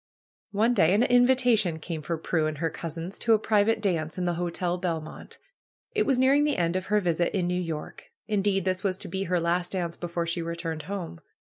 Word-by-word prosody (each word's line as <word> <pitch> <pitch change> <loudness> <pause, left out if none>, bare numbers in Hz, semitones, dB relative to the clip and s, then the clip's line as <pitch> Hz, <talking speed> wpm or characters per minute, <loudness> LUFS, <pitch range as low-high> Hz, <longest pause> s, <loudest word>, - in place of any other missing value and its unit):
One 215 +4 +2
day 185 -4 +4
an 220 - +4
invitation 245 -7 +4
came 160 0 -5
for 165 +3 -3
Prudence 160 -1 0
and - - -10
her 165 +1 -1
cousins 165 +3 -6
to 225 -1 +4
a - - +3
private 215 +1 +2
dance 165 -6 -1
in 180 - -1
the 175 - +1
Hotel 175 +1 -2
Belmont. 165 -3 -5 0.6
It 430 -1 +1
was 270 -3 +3
nearing 270 +3 +4
the 295 -1 +1
end 170 0 0
of 185 0 -2
her 210 +1 +3
visit 175 +1 0
in 180 - 0
New 180 +1 0
York. 160 -3 -6 0.2
In 210 -2 +1
deed, 195 -2 +1
this 185 0 -1
was 190 -2 0
to - - -8
be 190 +2 -3
her 180 -1 +1
last 175 +2 0
dance 170 -3 -2
before 170 -1 -3
she 170 +1 -1
returned 165 -1 -4
home. 180 - -5
180 Hz, 215 wpm, -27 LUFS, 170-205 Hz, 0.6 s, day